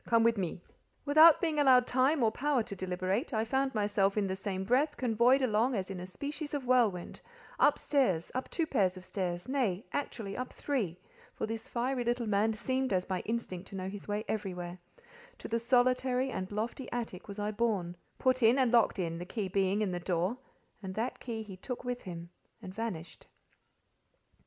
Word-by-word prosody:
Come 230 -1 +3
with 230 0 +4
me." 180 -4 -3 0.5
Without 310 +3 +8
being 315 -3 0
allowed 255 -3 +6
time 260 +3 +2
or 220 - +4
power 270 0 +1
to 200 - -7
deliberate, 185 - -2
I 220 +1 +1
found 265 +2 0
myself 205 -1 +1
in 205 - +2
the 190 -1 -2
same 190 -1 -3
breath 270 +8 +2
convoyed 245 +2 +3
along 235 +2 +2
as 195 -1 -3
in 190 - -5
a 180 - -6
species 290 - -5
of 275 -3 -3
whirlwind, 230 -8 +1 0.4
up - - +5
stairs, 215 - +1
up 255 - -3
two 330 - 0
pair 245 -10 +2
of 185 0 -4
stairs, 180 0 -3
nay, 240 -7 0
actually 220 -8 -3
up 255 0 -4
three 220 - -2 0.4
(for - - -2
this 225 0 -5
fiery 250 +1 -1
little 240 0 0
man 215 +1 +2
seemed 260 +3 -1
as 185 -1 +1
by 185 -1 -2
instinct 195 -5 -3
to - - -9
know 190 0 -3
his 200 0 -8
way 210 +1 -2
everywhere); 180 -4 -4 0.6
to - - -7
the 230 0 0
solitary 255 +2 +2
and 190 -3 -4
lofty 225 +5 -4
attic 225 -6 -4
was 200 0 -7
I 210 0 -1
borne, 205 -6 -1 0.2
put 255 0 +2
in 230 +3 +5
and 255 -3 +3
locked 235 -3 +4
in, 165 -3 -2
the 175 - -5
key 205 -2 -3
being, 195 +2 +1
in 195 - -1
the 175 - -2
door, 180 +4 0 0.5
and 190 -2 -6
that 230 +3 -2
key 225 -3 -5
he 195 -3 -10
took 250 +7 -6
with 245 0 -3
him 170 -1 -8 0.3
and 185 - -9
vanished. 190 -7 -5
220 Hz, 195 wpm, -31 LUFS, 190-255 Hz, 0.6 s, Without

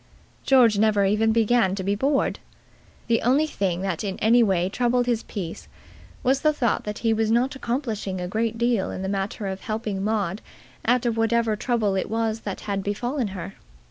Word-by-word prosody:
George 240 -6 +5
never 210 -2 +3
even 215 +3 +2
began 225 -3 +2
to 190 - -4
be 200 +2 +1
bored. 275 +7 0 0.7
The 230 -1 +1
only 270 +6 +3
thing 190 - -2
that 190 -2 -2
in 195 -2 -3
any 235 +3 +4
way 190 -5 +2
troubled 245 +4 +1
his 235 -2 0
peace 180 -6 -7 0.6
was 265 +2 +2
the 305 - +4
thought 255 -6 0
that 210 0 -4
he 225 - +4
was 220 0 0
not 245 +5 +2
accomplishing 235 -7 -3
a 180 - -3
great 225 +3 -1
deal 235 -4 +1
in 185 - -5
the - - -2
matter 195 +1 -3
of 190 0 -4
helping 215 -3 -3
Maud 205 -2 -1 0.4
out 245 +1 +2
of 230 -1 0
whatever 225 -1 +2
trouble 220 -3 0
it 190 - -2
was 225 0 -1
that 200 -3 -6
had 200 -2 -2
befallen 240 +5 -2
her. 195 0 -7
220 Hz, 190 wpm, -24 LUFS, 200-240 Hz, 0.7 s, George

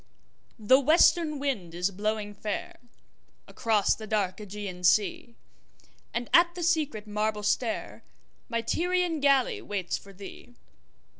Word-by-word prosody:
THE 245 +4 +5
WESTERN 310 +1 +4
wind 220 -12 -3
is 180 +3 0
blowing 210 +1 -3
fairAcross 215 +1 -3
the 220 - -9
dark 200 -4 -1
Ægean 200 -3 -7
sea, 210 +5 +2 0.8
And 235 0 -3
at 345 0 +5
the 350 - -4
secret 305 -10 0
marble 210 0 -2
stairMy 230 +1 -4
Tyrian 355 0 0
galley 275 -3 +2
waits 195 -4 -3
for 200 - -15
thee. 200 +5 -12
220 Hz, 115 wpm, -28 LUFS, 205-280 Hz, 0.8 s, THE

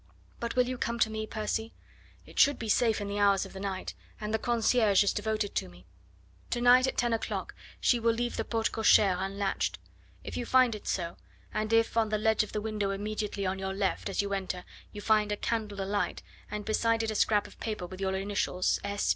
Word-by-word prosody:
But 235 0 -3
will 250 -1 +3
you 255 -1 -4
come 235 0 -1
to 220 -1 +2
me, 220 0 -3
Percy? 220 +1 -3 0.5
It - - -7
should 285 -1 +6
be 225 - -5
safe 225 +1 +3
in 205 - -4
the 200 0 -3
hours 200 -1 +4
of - - -11
the 190 - -7
night, 190 -1 -4 0.3
and 215 0 -4
the 220 - +2
concierge 225 -3 +3
is 200 - +1
devoted 215 -1 -1
to - - -2
me. 90 0 -17 0.6
To 240 - -1
night 250 +2 +6
at - - -3
ten 240 -1 +2
o'clock 225 - -3 0.3
she 240 - +3
will 230 0 +3
leave 240 +1 -2
the - - -1
porte 225 -1 -1
cochere 210 -3 +5
unlatched. 195 +1 -1 0.5
If - - -6
you - - -2
find 255 -2 +5
it 210 - -8
so, 170 -2 -2 0.4
and 215 0 -1
if 225 0 +3
on 220 -1 +3
the 215 - +1
ledge 220 0 +3
of 215 - -4
the 210 - -2
window 210 -2 -2
immediately 205 0 -3
on 190 +1 -1
your 190 0 -3
left 195 +1 -1
as 195 - 0
you 200 0 -3
enter 185 -2 -3 0.3
you 205 - -8
find 215 0 +2
a 205 - -1
candle 215 -3 -2
alight, 200 +1 -2 0.3
and 210 0 -5
beside 225 +1 +1
it 220 - -1
a - - -4
scrap 210 0 +3
of - - -14
paper 215 -5 -3
with 185 +2 -9
your 190 0 0
initials 195 -2 0
S. 200 0 -2
215 Hz, 225 wpm, -30 LUFS, 200-225 Hz, 0.6 s, should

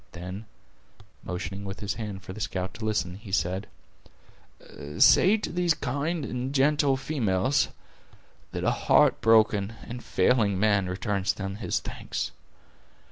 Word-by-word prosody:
Then, 90 +4 -7 0.8
motioning 95 +2 -5
with 95 0 -6
his 100 -2 -2
hand 105 -4 -6
for 95 - -8
the 110 - -9
scout 95 -2 -3
to 115 -1 -6
listen, 100 -4 -1
he 105 -1 -11
said: 95 +1 -1 1.3
"Say 200 +4 +6
to 210 - -5
these 175 -2 +2
kind 145 +4 -2
and 125 +3 -4
gentle 140 0 +3
females, 130 -3 +1 0.8
that - - -4
a - - +3
heart - - +3
broken 110 -2 +3
and 120 +1 -8
failing 100 -1 +2
man 100 -3 +2
returns 95 0 -1
them 95 0 -5
his 115 - -1
thanks. - - -5
105 Hz, 135 wpm, -27 LUFS, 95-130 Hz, 1.3 s, Say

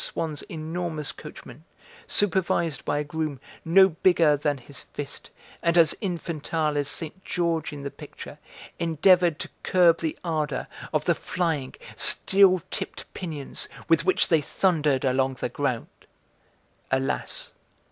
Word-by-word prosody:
Swann's 155 -3 -3
enormous 160 -1 -3
coachman, 150 -2 -11 0.4
supervised 170 -6 +1
by - - 0
a 150 - 0
groom 150 -2 -3 0.2
no 190 +4 +6
bigger 165 -2 +4
than 145 0 -1
his 140 +2 -10
fist, 145 -1 -8 0.3
and 170 0 +2
as 165 -3 +6
infantile 165 -4 -2
as 145 -1 0
Saint 165 +4 -6
George 170 -3 -1
in 145 -2 -8
the 140 - -4
picture, - - -11 0.4
endeavoured 170 0 +4
to - - -5
curb 175 -3 +4
the 160 -2 -2
ardour 155 -5 -1 0.3
of - - 0
the - - +4
flying, 160 -7 -2 0.2
steel 190 -3 +4
tipped - - -5
pinions 155 -7 -5 0.2
with 165 0 +4
which 185 +1 +3
they 160 -3 +4
thundered 150 -6 +1
along 130 0 +1
the 125 - -3
ground. 125 -2 -1 1.0
Alas! 130 0 -2
160 Hz, 135 wpm, -26 LUFS, 145-170 Hz, 1.0 s, no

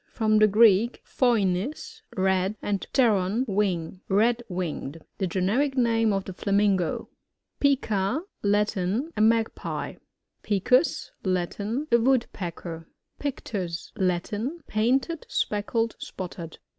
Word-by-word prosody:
— - - -35
From 215 -1 +4
the 215 - +7
Greek, 215 +2 +4
phoinix, 240 - 0 0.2
red, 190 +1 +1
and 200 -2 -2
pteron^ 225 -1 +2
wing. 190 -3 -1
Red 230 +5 +3
winged. 165 -4 -4 0.2
The 190 - 0
generic 220 - 0
name 225 -3 +3
of 195 -1 -1
the 190 - -6
Flamingo. 200 -2 +1 0.5
Pica. 255 - +1
— - - -53
Latin. 210 - 0
A - - 0
Magpie. 225 +1 0 0.4
Picus. 220 - +2
— - - -43
Latin. 205 - -3
A 235 - +6
Woodpecker. 175 -9 -1 0.3
PfCTUi. 195 -11 -4
— - - -43
Latin. 215 - -3
Painted, 260 +9 0
speckled, 225 +2 -1
spotted. 170 -3 -7
210 Hz, 120 wpm, -26 LUFS, 185-235 Hz, 0.5 s, the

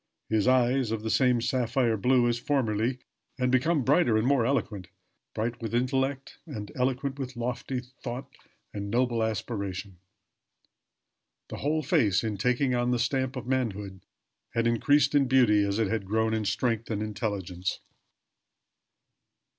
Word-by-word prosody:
His 110 0 +1
eyes 130 -1 +3
of 110 -1 -3
the 110 - -1
same 125 -3 +3
sapphire 120 -1 +1
blue 125 +3 +3
as 120 0 0
formerly, 120 -3 0 0.4
and 125 -1 +1
become 140 +3 +2
brighter 130 -4 +3
and 110 - +1
more 130 -4 +3
eloquent 110 -9 -1 0.5
bright 115 +2 -2
with 115 0 -3
intellect 135 +2 -1
and 105 -9 -7
eloquent 135 +2 -1
with 130 -1 -5
lofty 125 +2 -3 0.2
thought 125 +1 -5 0.5
and 100 -1 -4
noble 120 0 +1
aspiration. 100 -4 -3 1.5
The - - -6
whole 155 +2 0
face, 125 - +2
in 110 -2 -2
taking 125 +5 +1
on 120 0 +1
the 125 - +2
stamp 130 +2 -1
of 130 - -5
manhood, 105 -7 -2 0.5
had 115 0 +1
increased 145 +7 +3
in 140 -2 +4
beauty 120 -6 +4
as 100 0 -1
it 115 - +2
had 105 -2 -2
grown 110 +2 +1
in 110 -1 -1
strength 115 +1 -1
and 105 -2 -2
intelligence. 100 -4 -3
120 Hz, 145 wpm, -28 LUFS, 110-130 Hz, 1.5 s, in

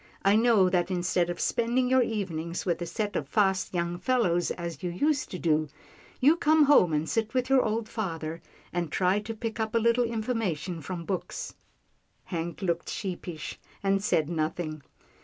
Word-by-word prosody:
I 200 +1 +6
know 220 -4 +5
that 180 0 +1
instead 180 -1 +1
of 175 - -4
spending 240 +2 +1
your 260 0 +4
evenings 180 -7 -2
with 175 -2 0
a 175 - -3
set 205 +4 -3
of - - -2
fast 190 -3 +2
young 175 -1 -2
fellows 195 -10 +1
as 170 -4 -5
you 180 - -2
used 285 - 0
to 185 - -5
do, 155 -3 +1 0.5
you 300 +6 +5
come 310 -1 +4
home 275 - +5
and 155 +1 0
sit 220 +4 -1
with 255 +1 0
your 270 -1 +6
old 220 0 -1
father, 165 -7 -4 0.3
and 170 -3 -2
try 185 +2 +2
to 220 +2 -6
pick 225 0 -4
up 220 +1 -2
a - - +6
little 235 +2 +3
information 215 - -2
from 170 +2 -5
books." 190 -1 -4 0.7
Hank 170 +1 -4
looked 170 -2 -1
sheepish, 175 -4 -5 0.2
and 195 0 +2
said 160 -7 +2
nothing. 155 -1 -2
190 Hz, 175 wpm, -28 LUFS, 170-225 Hz, 0.7 s, I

